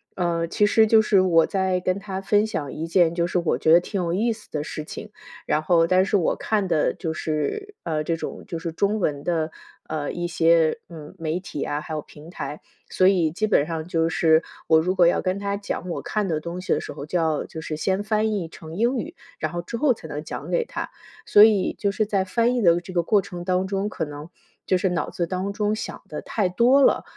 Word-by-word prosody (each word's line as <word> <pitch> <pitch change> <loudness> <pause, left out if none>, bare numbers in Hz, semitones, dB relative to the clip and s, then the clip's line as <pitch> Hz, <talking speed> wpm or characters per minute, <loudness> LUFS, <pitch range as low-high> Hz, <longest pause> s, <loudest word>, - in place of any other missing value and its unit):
呃， 170 -2 0
其 205 +5 +2
实 220 +1 +4
就 220 0 +6
是 200 -3 +4
我 165 -3 +4
在 190 -2 0
跟 185 +2 -1
他 195 -2 -5
分 205 +2 +2
享 145 -10 -4
一 160 +2 -4
件， 170 -1 +3
就 170 0 0
是 180 - -1
我 170 -2 +1
觉 160 - +2
得 170 - +8
挺 190 +1 -3
有 170 -1 -1
意 225 +5 +1
思 215 - -16
的 150 -1 -3
事 155 - -6
情， - - -9 0.3
然 155 - +1
后 165 +1 +3
但 185 +2 +4
是 205 +1 +2
我 170 - +1
看 210 -3 -1
的 155 -4 +2
就 160 -4 -3
是， 160 - -3
呃， 155 -2 -1
这 165 +1 -1
种 - - -6
就 170 - -4
是 165 0 -4
中 200 +6 0
文 145 -5 -1
的， 160 -2 -1 0.4
呃， 155 -2 -3
一 175 - -3
些， 165 +2 +3
嗯， 155 -3 -10
媒 165 +1 -2
体 180 -6 -7
啊， 145 +1 -2
还 155 - -7
有 155 - -2
平 155 +4 -14
台。 150 - -6 0.3
所 185 - +3
以 175 -5 +3
基 205 +7 -1
本 165 -8 +2
上 160 -1 -4
就 165 -1 +1
是， 160 -1 +4 0.2
我 160 0 +5
如 185 +3 0
果 175 - +5
要 170 - +3
跟 185 +1 -1
他 200 0 -2
讲 200 -2 -5
我 170 - -3
看 210 -2 -2
的 160 -4 0
东 170 +3 -6
西 185 - 0
的 - - 0
时 - - -7
候， 140 - -7
就 175 +4 -1
要 160 -2 0
就 160 - -8
是 155 -1 -4
先 190 +5 0
翻 215 +1 +1
译 175 -6 -3
成 160 -2 -10
英 240 +6 +1
语， 325 +9 -5 0.2
然 155 0 -3
后 175 - -2
之 235 +7 -6
后 275 -1 +3
才 160 - -11
能 150 +1 -5
讲 - - -7
给 480 -2 +1
他。 - - -5 0.4
所 205 - +8
以 210 -4 +4
就 200 - 0
是 210 +1 -1
在 195 -3 +1
翻 235 +6 +1
译 240 - 0
的 170 -1 +4
这 185 - -10
个 175 -2 +1
过 205 +3 +3
程 175 -1 -8
当 185 +1 0
中， 195 +1 -1
可 180 - -3
能， 150 +2 -9 0.4
就 185 - +2
是 190 - 0
脑 170 -4 -2
子 170 - -2
当 185 +3 -2
中 210 +1 0
想 - - -6
得 - - -6
太 205 -4 -1
多 240 +9 +4
了， - - +4
180 Hz, 265 characters per minute, -24 LUFS, 160-200 Hz, 0.4 s, 得